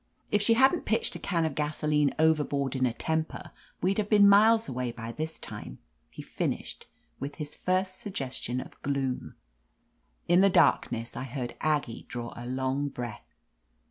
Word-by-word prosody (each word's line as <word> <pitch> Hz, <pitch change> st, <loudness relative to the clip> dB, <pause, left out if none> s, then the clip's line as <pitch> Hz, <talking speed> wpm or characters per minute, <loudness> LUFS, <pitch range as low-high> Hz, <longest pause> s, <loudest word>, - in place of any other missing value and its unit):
If 205 Hz, -, +3 dB
she 230 Hz, +2 st, +4 dB
hadn't 265 Hz, +8 st, +4 dB
pitched 465 Hz, -, +1 dB
a -, -, -5 dB
can 170 Hz, -4 st, 0 dB
of 160 Hz, -, -1 dB
gaso 150 Hz, +1 st, -2 dB
line 150 Hz, -2 st, +3 dB
overboard 145 Hz, -4 st, +2 dB
in 130 Hz, -1 st, +2 dB
a -, -, 0 dB
temper, 160 Hz, +4 st, -3 dB, 0.3 s
we'd 195 Hz, +3 st, +2 dB
have 210 Hz, -1 st, -1 dB
been 205 Hz, -2 st, +7 dB
miles 220 Hz, +3 st, +6 dB
away 125 Hz, -1 st, -2 dB
by 115 Hz, -1 st, -7 dB
this 155 Hz, +5 st, -4 dB
time," -, -, -8 dB, 0.3 s
he -, -, -9 dB
finished, -, -, -4 dB, 0.3 s
with 140 Hz, +1 st, -5 dB
his 150 Hz, -2 st, -7 dB
first 185 Hz, 0 st, -1 dB
suggestion 130 Hz, -, -4 dB
of -, -, -10 dB
gloom. 135 Hz, -2 st, -2 dB, 0.9 s
In 175 Hz, +2 st, +5 dB
the 195 Hz, -, +6 dB
darkness 115 Hz, -9 st, +2 dB
I -, -, -4 dB
heard 125 Hz, -1 st, -5 dB
Aggie 145 Hz, -7 st, -1 dB
draw 120 Hz, -1 st, -5 dB
a 120 Hz, +1 st, -7 dB
long 130 Hz, +2 st, -1 dB
breath. 120 Hz, -5 st, -7 dB
150 Hz, 170 wpm, -29 LUFS, 130-185 Hz, 0.9 s, been